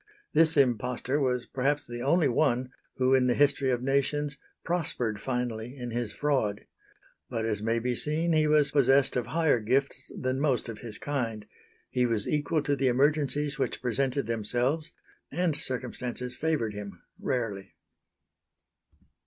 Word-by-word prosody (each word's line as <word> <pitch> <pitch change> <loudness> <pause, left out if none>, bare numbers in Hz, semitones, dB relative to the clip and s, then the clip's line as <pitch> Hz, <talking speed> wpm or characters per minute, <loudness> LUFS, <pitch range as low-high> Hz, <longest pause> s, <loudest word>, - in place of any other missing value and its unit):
This 160 -1 +4
impostor 125 +1 +1
was 125 -3 0
perhaps 140 +2 0
the 120 0 -6
only 150 +4 +3
one 130 -1 +1 0.2
who 130 0 +2
in 130 -1 +4
the 120 - +2
history 140 -2 +3
of 125 -1 0
nations 140 +2 0 0.3
prospered 125 - -1
finally 125 -1 -3
in 120 -2 -5
his 120 -2 -2
fraud. 130 -7 0 0.6
But 115 -3 -2
as 105 -2 -1
may 115 +2 +1
be 125 +2 0
seen 155 +6 +2
he 155 -1 +3
was 150 -1 +4
possessed 135 -1 +4
of 125 - -1
higher 160 -6 +2
gifts 130 +6 -1
than 130 +1 -1
most 135 -5 +1
of 115 -2 -7
his 110 -3 -7
kind; 115 -7 -3 0.5
he 125 -1 +2
was 110 -3 -1
equal 150 +1 0
to 145 - +1
the 135 -1 +1
emergencies 145 +2 +1
which - - -1
presented 130 +2 0
themselves 120 +8 -1 0.4
and 170 0 0
circumstances 125 -1 -4
favoured 145 -8 -1
him, 100 -1 -8 0.2
rarely. 105 -6 -3
130 Hz, 150 wpm, -28 LUFS, 120-145 Hz, 0.6 s, This